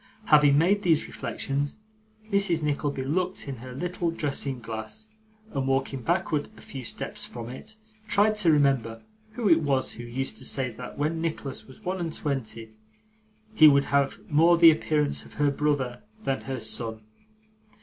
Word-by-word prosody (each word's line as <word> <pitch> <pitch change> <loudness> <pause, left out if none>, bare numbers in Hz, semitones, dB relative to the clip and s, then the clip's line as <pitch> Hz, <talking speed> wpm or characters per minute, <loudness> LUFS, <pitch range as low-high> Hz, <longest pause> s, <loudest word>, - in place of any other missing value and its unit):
Having 145 -3 +6
made 190 +6 +3
these 165 -5 +3
reflections, 140 +4 -3 0.5
Mrs. 195 -5 +2
Nickleby 145 -2 -1
looked 180 +5 -2
in 135 -2 -5
her 125 +2 -9
little 175 +5 -2
dressing 140 -4 -1
glass, 115 - -7 0.4
and 135 -2 -1
walking 135 0 0
backward 170 0 0
a - - -13
few 135 -2 -8
steps - - -5
from 115 -1 -7
it, 210 - -9 0.3
tried 210 +1 +3
to 180 -6 +4
remember 135 -6 +1 0.3
who 235 -2 -1
it 165 -3 +6
was 140 -3 +1
who 120 - -9
used 125 +3 -4
to - - -5
say 130 -3 0
that 125 +2 -9
when 155 +3 -1
Nicholas 155 -5 -4
was 130 - -15
one 185 +1 -2
and 165 -2 -3
twenty 115 -6 -4 0.8
he 155 -7 +8
would 140 -1 +5
have 140 -1 +2
more 165 +3 +5
the 165 -1 +9
appearance 150 -2 0
of - - -15
her 145 -1 +2
brother 140 -4 -1 0.2
than 135 -1 -1
her 130 -1 -3
son. 110 0 -1
145 Hz, 165 wpm, -26 LUFS, 130-165 Hz, 0.8 s, the